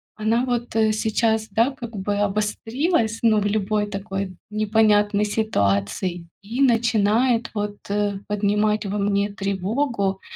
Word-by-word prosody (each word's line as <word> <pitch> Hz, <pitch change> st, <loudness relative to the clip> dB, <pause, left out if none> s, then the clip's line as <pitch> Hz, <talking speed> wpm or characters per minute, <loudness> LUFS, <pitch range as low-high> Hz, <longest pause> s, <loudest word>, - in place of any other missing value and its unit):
она 225 Hz, +3 st, +1 dB
вот, 245 Hz, -2 st, -2 dB
э, 220 Hz, -1 st, +3 dB
сейчас, 220 Hz, 0 st, 0 dB
да, 230 Hz, +7 st, +2 dB
как 235 Hz, -4 st, -8 dB
бы 200 Hz, +1 st, -1 dB
обострилась, 220 Hz, -, 0 dB
ну, 215 Hz, -2 st, +4 dB
в 205 Hz, -, -2 dB
любой 210 Hz, 0 st, 0 dB
такой 195 Hz, -2 st, -5 dB
непонятной 210 Hz, -1 st, +2 dB
ситуации 170 Hz, -, -1 dB
и 230 Hz, +7 st, -4 dB
начинает 230 Hz, -1 st, +2 dB
вот, 205 Hz, -1 st, -3 dB
э, 205 Hz, -1 st, 0 dB
поднимать 210 Hz, +1 st, +1 dB
во 200 Hz, +1 st, -2 dB
мне 200 Hz, 0 st, +1 dB
тревогу. 200 Hz, +1 st, -1 dB
210 Hz, 125 wpm, -23 LUFS, 200-225 Hz, -, ну